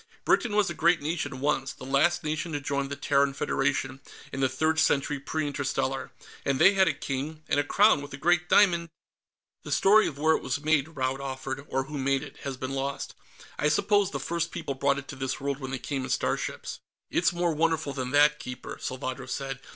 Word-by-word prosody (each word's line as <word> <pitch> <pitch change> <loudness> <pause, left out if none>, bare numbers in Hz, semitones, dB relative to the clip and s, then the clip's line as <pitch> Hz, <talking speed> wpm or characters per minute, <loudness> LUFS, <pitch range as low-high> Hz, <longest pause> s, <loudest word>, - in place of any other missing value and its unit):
Britain 225 -4 +2
was 210 -2 +3
a - - -2
great 170 +1 +3
nation, 145 -3 -3
once; 140 -2 0
the - - -13
last 140 +7 +2
nation 155 +2 -2
to 145 - -1
join 140 0 -2
the 140 - -4
Terran 140 -1 +2
Federation, 135 -1 -1 0.3
in 135 - -4
the 135 -1 +2
Third 160 +5 +1
Century 145 0 +2
Pre 155 +3 -2
Interstellar. 135 -2 -2 0.3
And 135 -1 +1
they 195 - +6
had 190 -1 +4
a - - +2
king, 145 +4 -4
and - - +2
a - - +2
crown 205 +2 +4
with 145 0 -9
a 140 - -6
great 175 +3 +2
diamond...." 170 -5 +4 0.7
"The - - -8
story 210 +3 +5
of 140 - -6
where 160 +2 +3
it - - -3
was 130 +3 -3
made," 155 -2 +2
Rand 130 +1 -1
offered, 135 0 -5
"or 135 - 0
who 145 +2 -6
made 135 +1 +1
it, 145 - -11
has 135 -2 -5
been 130 +1 -4
lost. 135 +1 -3 0.5
I 150 - +3
suppose 200 +5 +3
the 140 - -4
first 170 +4 -2
people 140 - -4
brought 140 +1 +1
it 140 0 -7
to - - -6
this 135 -1 -3
world 140 0 -2
when 130 -2 -5
they 135 - -2
came 130 +2 -3
in - - -5
starships." - - -2 0.3
"It's 170 - +3
more 175 -1 0
wonderful 160 -2 0
than 130 -2 -3
that, 150 +2 +4
Keeper," 125 0 -7
Salvadro 130 0 -4
said. 135 -2 -4
140 Hz, 215 wpm, -27 LUFS, 135-160 Hz, 0.7 s, they